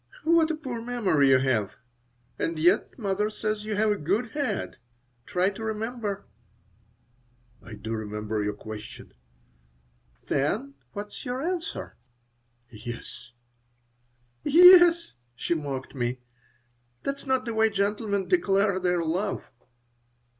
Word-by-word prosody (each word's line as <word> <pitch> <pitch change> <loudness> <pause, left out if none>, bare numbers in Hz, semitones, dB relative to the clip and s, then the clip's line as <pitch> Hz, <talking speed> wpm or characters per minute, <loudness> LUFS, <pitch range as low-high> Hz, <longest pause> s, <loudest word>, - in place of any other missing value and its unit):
"What 330 -1 +4
a 320 - 0
poor 255 -7 -5
memory 210 - +2
you 130 - +7
have! 120 -6 0 0.6
And 165 0 -1
yet 175 +6 +2
mother 205 -2 0
says 215 0 -3
you 215 -1 -2
have 215 +1 +2
'a 205 - 0
good 205 +10 -1
head.' 285 0 -2 0.5
Try 185 +2 +1
to 215 +3 -8
remember." 220 -2 -3 1.4
"I - - -11
do 110 +2 -7
remember 105 0 -3
your 105 0 -2
question." 105 0 -9 1.1
"Then 220 - -1 0.2
what 205 0 -5
is - - -9
your 250 +2 -3
answer?" 345 -1 -4 0.7
"Yes." 120 +2 -9 1.1
"Yes!" 345 +1 +7 0.2
she 150 - -1
mocked 140 -5 -4
me. 125 -2 -2 0.9
"That's 275 0 -4
not 260 -1 +1
the 230 - -3
way 220 0 +3
gentlemen 200 0 -1
declare 200 - +2
their 180 -2 +1
love." 185 +5 -2
205 Hz, 120 wpm, -27 LUFS, -, 1.4 s, you